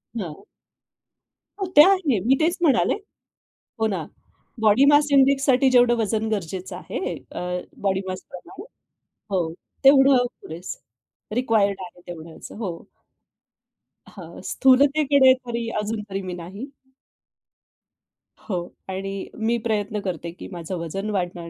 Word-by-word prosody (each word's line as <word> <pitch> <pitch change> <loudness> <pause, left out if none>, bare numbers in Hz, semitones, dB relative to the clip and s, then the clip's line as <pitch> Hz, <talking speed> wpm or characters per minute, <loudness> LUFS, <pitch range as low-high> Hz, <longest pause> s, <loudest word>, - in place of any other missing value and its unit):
हां. 175 -9 -6 1.2
हो, 390 - -1
ते 295 - +12
आहे. 335 - +2
मी 260 +3 +5
तेच 330 +3 +1
म्हणाले. 280 -8 +3 0.9
हो 220 - +2
ना, 185 -7 -3 0.6
बॉडी 220 +5 +5
मास 290 0 +5
इंडेक्ससाठी 270 -1 +4
जेवढं 245 -1 +5
वजन 220 0 0
गरजेचं 190 -2 -4
आहे. 230 - -4 0.2
अ, - - -6 0.4
बॉडीमासप्रमाणे 190 - -4 0.7
हो, 180 -3 +1 0.4
तेवढं 270 -2 +6 0.2
पुरेसं 160 - -11
रिक्वायर्ड 215 -5 +2
आहे 175 -1 -10
तेवढ्याच 165 -2 -10
हो. 205 -5 -4 1.4
हां, - - -10
स्थूलतेकडे 275 0 +5
तरी 235 -1 -4
अजून 215 +1 -3
तरी 195 0 -3
मी 185 -1 -5
नाही. 195 +9 -7 1.8
हो 185 - 0 0.3
आणि 195 +1 -4 0.2
मी 225 +2 0
प्रयत्न 210 -1 -1
करते 170 -2 -4
की 175 - -10
माझं 175 0 -5
वजन 195 +6 -4
वाढणार 175 -4 -3
215 Hz, 115 wpm, -23 LUFS, 185-260 Hz, 1.8 s, ते